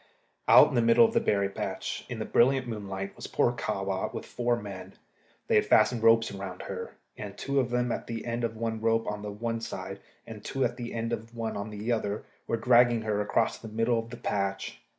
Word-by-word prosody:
Out - - +8
in - - -6
the 120 - +3
middle 115 - +6
of 225 - 0
the 230 - +4
berry 100 - +1
patch, 100 - -4
in - - -4
the - - -3
brilliant 130 +1 +3
moonlight, 100 -3 -5
was - - -7
poor - - +2
Kahwa - - -2
with - - -6
four 120 -1 0
men. 95 -2 -8 0.5
They - - -1
had - - +5
fastened 120 -3 +4
ropes 115 0 +5
around 95 -2 -6
her, - - -6 0.2
and 100 -1 -7
two 140 0 0
of 125 -2 0
them 125 0 0
at - - -4
the 115 -1 -5
end 120 0 -2
of 115 -1 -2
one 110 -1 -2
rope 115 0 +2
on 105 0 -4 0.2
one 115 -1 -2
side, 95 -3 -6 0.3
and 110 -2 -9
two 135 -1 0
at 120 0 -2
the 120 -1 -6
end 115 +1 -2
of 115 +1 -6
one 115 -1 -3
on 100 +1 -4
the 105 +3 -3
other, 105 -2 -1 0.2
were 115 - 0
dragging 120 -1 +4
her 105 -1 0
across 110 +2 0
the 115 - -9
middle 115 +2 +1
of 115 0 -6
the 120 - -8
patch. 100 -1 -2
115 Hz, 225 wpm, -28 LUFS, 105-120 Hz, 0.5 s, Out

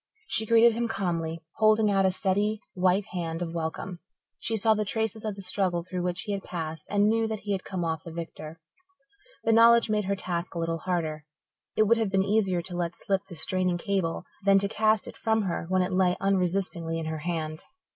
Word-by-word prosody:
She 220 - +2
greeted 230 +1 +6
him 235 +1 -1
calmly, 165 -6 -2
holding 215 -1 +4
out 195 -1 +3
a - - +2
steady, 205 +3 +1
white 185 +2 +2
hand 165 -1 -2
of 165 -1 -5
welcome. 170 +2 -4 0.4
She 225 - -1
saw 220 +1 +4
the 215 0 0
traces 220 +1 -2
of 215 -2 -3
the 195 - -7
struggle 185 -2 0
through 180 0 -4
which 180 +1 -2
he 210 - -4
had 200 -1 -2
passed 160 -3 -5
and 205 0 +3
knew 225 +1 +2
that 220 -2 -4
he 205 - -4
had 195 -2 -1
come 180 -3 -3
off 160 -2 -2
victor. 165 -1 -7 0.8
The 225 - +3
knowledge 230 0 +6
made 210 -1 +1
her 200 +1 0
task 180 -2 -3
a - - -2
little 165 0 -1
harder. 160 -4 -2 0.5
It 215 - +5
would 230 +2 +4
have 225 -3 0
been 190 0 +2
easier 195 -4 +1
to 175 +1 -8
let 175 -1 -2
slip 195 0 -1
the 180 - -10
straining 185 +1 0
cable 180 -2 -1 0.2
than 195 0 +5
to 200 +1 +2
cast 215 0 +2
it - - -8
from 220 -1 +1
her 170 -3 -3
when 185 0 +3
it 185 +1 -3
lay 185 -1 +3
unresistingly 185 -3 0
in 165 - -3
her 160 0 -3
hand. 155 -1 -3
190 Hz, 215 wpm, -27 LUFS, 170-210 Hz, 0.8 s, greeted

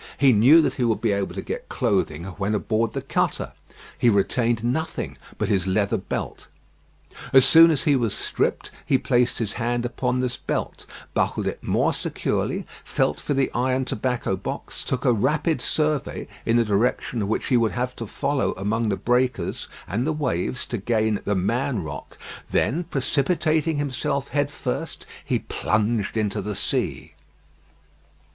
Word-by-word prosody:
He 135 -3 +5
knew 135 +10 +7
that - - +1
he 130 - -2
would 115 -2 +1
be 115 - +1
able 100 -1 -1
to - - -4
get - - -5
clothing 75 +2 0
when 95 +3 -2
aboard 110 +2 0
the - - -3
cutter. - - -1 0.5
He 120 - +5
retained 115 +2 +1
nothing 140 +7 -2 0.2
but - - -1
his 95 -2 +1
leather 100 +1 +1
belt. - - -5 0.8
As 135 -1 +7
soon 165 +3 +8
as 155 -4 +1
he 145 - +4
was 115 -5 0
stripped - - -1
he 135 - +3
placed 125 -2 +1
his 110 -3 -2
hand 120 +1 0
upon 125 +1 -1
this 125 0 -1
belt, - - -4 0.3
buckled - - 0
it - - -3
more - - +1
securely, - - -2 0.2
felt - - 0
for 145 - -1
the 135 -1 +1
iron 130 +2 +1
tobacco 125 -4 -1
box, - - -5
took 130 - -2
a 125 - +5
rapid 150 - +1
survey 150 0 0 0.2
in 115 +1 +4
the 120 - +3
direction 105 +1 0
which 110 - -1
he 130 - +3
would 115 -2 +2
have 125 0 -2
to 115 - -5
follow 140 +5 0
among 110 +4 -1
the 100 - 0
breakers 125 -6 0 0.2
and 115 - -1
the - - +2
waves 130 - -1
to 120 - -4
gain 110 0 +1
"the 105 - +1
Man 115 +3 0
Rock;" 80 - -8 0.3
then 170 +7 +1
precipitating 155 +2 +1
himself 140 -1 -2
head 145 +2 0
first, - - -4 0.2
he - - 0
plunged 105 0 -1
into 105 -2 0
the 105 +1 -4
sea. - - -1
120 Hz, 165 wpm, -24 LUFS, 105-135 Hz, 0.8 s, soon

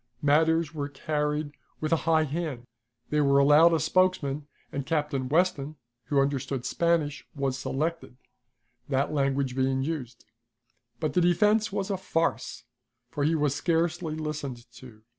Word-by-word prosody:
Matters 160 +2 +3
were 145 -2 -3
carried 150 +1 -2 0.3
with 155 0 -2
a 165 0 0
high 160 -1 +4
hand. 150 -5 -4 0.5
They 150 0 +2
were 140 -1 +4
allowed 150 +4 +6
a 165 - +2
spokesman, 150 -4 +1 0.2
and 140 - -3
Captain 145 -3 -1
Weston, 155 -2 +1 0.3
who 140 - +1
understood 135 -2 -1
Spanish, 165 -4 0
was 135 -2 -1
selected, 150 +1 -3 0.7
that 140 +2 0
language 135 -2 0
being 130 0 +1
used. 135 -6 -5 0.7
But 155 -3 -1
the 180 - +3
defense 210 +5 +3
was 195 0 -2
a 195 - 0
farce, 165 -3 -2 0.5
for 145 - -2
he 160 +3 +2
was 145 -3 +1
scarcely 165 +1 0
listened 145 -6 -5
to. 115 -4 -14
150 Hz, 140 wpm, -27 LUFS, 140-165 Hz, 0.7 s, allowed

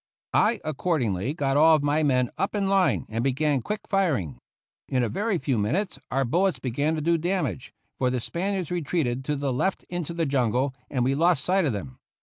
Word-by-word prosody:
I 225 +2 +3
accordingly 135 - -1
got 140 -3 0
all 160 +2 +7
of 150 - 0
my 145 +2 +2
men 125 -5 +2
up 195 - -2
in 200 -1 0
line 195 -1 +2
and 115 +2 -2
began 135 +1 +1
quick 210 - -4
firing. 135 - 0 0.5
In 125 -2 +1
a 115 - 0
very 205 - 0
few 135 -7 -1
minutes 170 - -1
our 135 +1 +1
bullets 180 +9 +1
began 140 +5 -1
to 155 - -2
do 170 +2 +2
damage, 170 - -2 0.3
for 130 - +2
the 125 0 -1
Spaniards 185 - -3
retreated 145 -7 -1
to 150 - 0
the 140 -2 -1
left 190 +10 -1
into 175 -2 -4
the 165 -1 0
jungle, 130 -1 +1 0.2
and 130 -3 0
we 130 +2 +2
lost 165 -1 +2
sight 190 0 +2
of 135 - 0
them. 90 -11 -7
145 Hz, 200 wpm, -26 LUFS, 125-175 Hz, 0.5 s, all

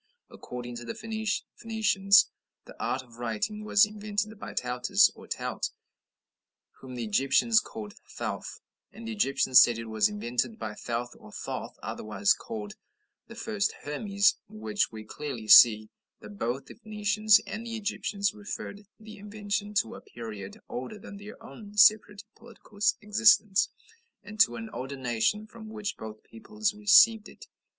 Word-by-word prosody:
"According 120 -1 -8
to 120 - -8
the 170 - -6
Phoenicians, 220 -2 +1 0.3
the - - -13
art 130 +1 -1
of 120 -2 -18
writing 120 - -3
was 210 0 +5
invented 210 0 -4
by - - -7
Taautus, 125 0 +3
or - - -14
Taut, - - -3 1.1
'whom 130 -1 -10
the 120 - -4
Egyptians 135 - +3
call 215 -2 -8 0.3
Thouth,' - - -5 0.3
and 225 0 -10
the - - -3
Egyptians 135 - +5
said 120 -2 +4
it 115 - -6
was 110 - +1
invented 125 - -2
by 110 -2 -5
Thouth, 120 +3 -4
or 105 - -14
Thoth, - - -6
otherwise 110 - 0
called 215 -3 -7 0.5
'the 230 - -11
first 220 -3 -1
Hermes,' 200 +7 +1
in 215 0 -12
which 210 -1 0
we 110 -1 -8
clearly 120 -1 -7
see 110 -1 +8 0.3
that 105 -1 -12
both 120 +4 -2
the - - -12
Phoenicians 215 -1 +2
and 225 +2 -6
Egyptians 205 -2 -2
referred 205 -1 -8
the 215 0 -12
invention 205 0 -4
to 115 - +1
a - - -10
period 105 -4 -9
older 130 - -6
than 200 0 -11
their 205 +1 -11
own 210 -2 -12
separate 210 -1 +5
political 225 -3 -17 0.2
existence, 210 -1 +4 0.5
and 210 +1 -11
to 230 - +5
an 225 -1 -6
older 135 +2 -5
nation, 125 - 0
from 220 0 -12
which 215 -2 -4
both 110 -1 -9
peoples 210 - -3
received 210 +1 +5
it." - - -14
205 Hz, 150 wpm, -28 LUFS, -, 1.1 s, see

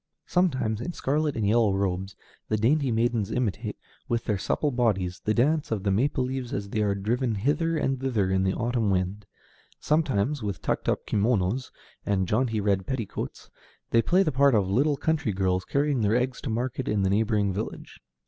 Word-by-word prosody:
Sometimes, 130 - +1
in 175 - -4
scarlet 150 +1 0
and 110 -3 0
yellow 110 -2 +3
robes, 95 0 -2 0.3
the 110 - +1
dainty 135 +5 +2
maidens 115 -2 +1
imitate, 120 -6 -2 0.3
with 120 0 -1
their 105 -3 0
supple 150 +9 0
bodies, 95 -8 0
the 110 - +2
dance 150 +5 +2
of 105 -4 -2
the 100 - +1
maple 130 +6 +1
leaves 130 -1 -4
as 100 0 -3
they 110 - -1
are 100 -1 +1
driven 115 +4 -1
hither 160 - 0
and 135 -3 0
thither 110 -8 0
in 95 0 +2
the 95 0 +1
autumn 115 -2 0
wind; 95 +2 -1 0.5
sometimes, 145 -3 +1
with 100 -3 -3
tucked - - -1
up - - -1
kimonos 110 +3 0 0.3
and 95 -2 0
jaunty 115 +2 +1
red 100 -2 0
petticoats, 120 -7 -5 0.4
they 115 - +5
play 185 +9 +3
the 155 - 0
part 135 -1 +4
of 100 -3 +2
little 140 +9 +2
country 145 -7 0
girls 95 -1 0
carrying 140 -3 +1
their 105 +1 +2
eggs 125 +1 -1
to - - -4
market 125 +3 -2
in 105 -2 +1
the 95 - +2
neighboring 105 -1 +1
village. 105 +4 -6
115 Hz, 185 wpm, -26 LUFS, 100-135 Hz, 0.5 s, they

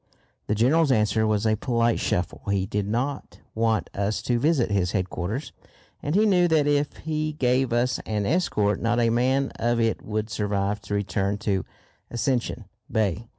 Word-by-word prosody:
The 105 - +1
General's 140 +7 +3
answer 110 -1 +2
was 105 0 +1
a 110 0 +3
polite 115 0 +1
shuffle. 90 - -1
He 100 -1 +1
did 100 0 -2
not 130 +6 -3
want 110 -4 +1
us 100 +2 -1
to 120 -1 +1
visit 140 -5 +2
his 95 -3 +1
headquarters, 95 - -3 0.5
and 145 +3 -2
he 215 +2 +4
knew 180 -4 +4
that 160 -3 +3
if 145 0 +1
he 155 -1 -2
gave 130 -2 +1
us 120 +1 +1
an 105 -2 -1
escort 105 - +1
not 120 +1 +1
a 115 -1 +3
man 130 +3 +1
of 120 0 +1
it 115 -1 +1
would 110 0 -3
survive 105 -1 -1
to 105 - -4
return 100 0 -1
to 100 -3 -1 0.4
Ascension 120 -2 -1 0.3
Bay. 110 -1 0
115 Hz, 170 wpm, -25 LUFS, 105-135 Hz, 0.5 s, he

